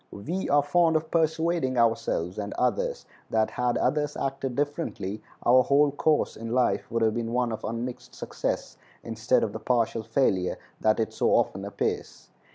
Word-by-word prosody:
We 170 - -4
are 145 0 +4
fond 165 +2 +3
of 155 0 -1
persuading 160 -4 +1
ourselves 110 -6 +1
and 100 0 -4
others - - -1 0.2
that 110 -1 +1
had 125 -1 0
others 150 -1 0
acted 135 -2 -3
differently 140 - -3 0.2
our 125 +2 +7
whole 140 +3 +3
course 150 +2 +1
in 115 +1 -6
life 125 0 +1
would 115 0 0
have 110 -1 +3
been 115 0 -3
one 125 -1 +1
of 110 - -5
unmixed 120 +2 -5
success - - -4 0.3
instead 115 +2 +1
of 105 - -2
the 110 - -5
partial 115 -1 0
failure 110 -5 +1 0.2
that 110 +1 +2
it 110 - -1
so - - +1
often 95 - +1
appears. 100 - -4
125 Hz, 165 wpm, -27 LUFS, 110-145 Hz, 0.3 s, our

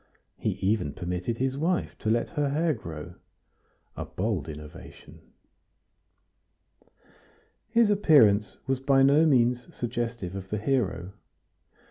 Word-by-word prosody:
He - - -2
even 95 -7 -1
permitted 90 +7 -3
his 130 +2 -1
wife 175 +3 -1
to 110 - -2
let 115 +1 +1
her 150 -4 0
hair 155 +3 +1
grow, 80 - -8 0.8
a - - -4
bold 95 -6 -3
innovation. 75 0 -11 2.5
His 230 -2 +4
appearance 115 - +4
was 135 -1 0
by 135 0 +3
no 145 +4 +5
means 125 -3 +2
suggestive 115 -5 -3
of 95 -1 -7
the 105 - -2
hero. 100 -7 -1
115 Hz, 115 wpm, -27 LUFS, 95-140 Hz, 2.5 s, no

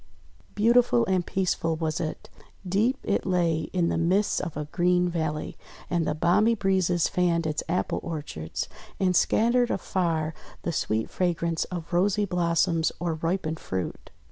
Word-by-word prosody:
Beautiful 225 - +4
and 185 -2 +1
peaceful 175 -3 0
was 160 -1 -2
it. 160 -2 -4 0.4
Deep 215 +8 +2
it 200 - 0
lay 170 -4 0
in 175 -2 +1
the - - 0
midst 185 +5 +2
of 170 -5 -5
a 150 - -3
green 180 +3 +2
valley, 160 -3 -3 0.3
and 170 -2 +1
the 150 - 0
balmy 200 +8 +3
breezes 185 -4 +2
fanned 170 -2 +1
its 155 -1 -1
apple 180 - 0
orchards, 145 - -5 0.3
and 185 -2 +2
scattered 240 +6 +3
afar 165 -4 -1 0.3
the 170 - -1
sweet 110 -7 -1
fragrance 170 -2 0
of 175 -2 -7
rosy 200 +4 +2
blossoms 170 -2 +1
or 170 -1 -1
ripened 160 0 -2
fruit. 95 -1 -5
175 Hz, 145 wpm, -26 LUFS, 160-185 Hz, 0.4 s, Beautiful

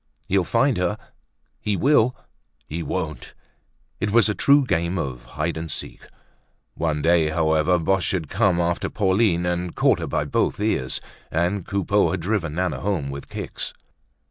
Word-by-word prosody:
He'll 95 0 +2
find 120 +5 +2
her—he 100 +2 -5
will—he 125 - -1
won't! 80 -6 -4 0.6
It 105 - 0
was 115 0 +5
a - - +1
true 140 +5 +4
game 85 -4 0
of 65 -7 -4
hide - - -3
and 80 0 -5
seek. - - -5 0.7
One 75 -3 -1
day, 80 -2 +4
however, 80 +2 +2
Boche 90 0 +1
had 85 -5 -2
come 90 +2 +2
after 85 0 0
Pauline 95 -3 +2
and 90 0 -2
caught - - +3
her - - -3
by - - 0
both - - 0
ears, 105 -12 0 0.3
and 85 +3 -1
Coupeau 100 +1 +2
had 95 -3 -2
driven 85 -5 -1
Nana 90 -2 -1
home 90 -9 -1
with 70 0 -8
kicks. - - -6
90 Hz, 150 wpm, -23 LUFS, 80-100 Hz, 0.7 s, was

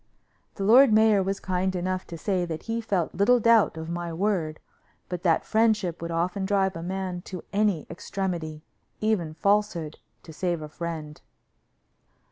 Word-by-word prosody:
The 195 - -4
lord 240 +5 +7
mayor 215 -2 +5
was 195 +1 -2
kind 185 0 -1
enough 185 +1 -2
to 170 - -7
say 185 +1 0
that 160 -2 -5
he 230 0 -2
felt 195 -7 -1
little 245 +6 +4
doubt 230 -6 +4
of 160 0 -6
my 170 0 -4
word, 165 -3 -1 0.5
but 180 -1 -4
that 170 -3 +2
friendship 215 -6 +1
would 170 - -4
often 175 +4 -1
drive 190 -1 +1
a 165 - -5
man 185 0 -4
to 185 -3 -7
any 200 -6 +1
extremity, 170 -5 -4 0.4
even 190 -8 0
falsehood, 200 -4 0 0.2
to 160 - -11
save 170 -1 -2
a 150 - -7
friend. 155 -2 -6
185 Hz, 160 wpm, -26 LUFS, 165-205 Hz, 0.5 s, lord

